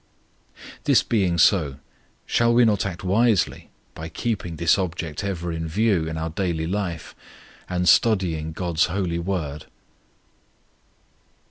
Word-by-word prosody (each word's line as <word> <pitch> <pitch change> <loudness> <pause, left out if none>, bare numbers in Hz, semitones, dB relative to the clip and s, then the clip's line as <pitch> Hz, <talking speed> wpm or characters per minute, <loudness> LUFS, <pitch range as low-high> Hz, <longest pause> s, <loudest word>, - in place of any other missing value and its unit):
This - - +4
being 95 -6 +1
so, 80 -8 +3 0.5
shall 115 0 +2
we 120 0 +6
not 105 -3 +1
act 90 -1 -7
wisely 105 +2 +1 0.2
by 80 +1 -7
keeping 90 -3 -3
this 85 +3 +2
object 85 -3 -4
ever 90 -3 -3
in 80 0 -4
view 95 -1 +1
in 80 0 -4
our 80 0 -3
daily 85 -2 -2
life 90 -2 -3 0.6
and 90 -1 -1
study 95 -8 +4
of 80 0 -6
GOD'S 85 -3 +1
holy 90 -2 -2
Word? 85 -5 -4
90 Hz, 130 wpm, -23 LUFS, 80-100 Hz, 0.6 s, we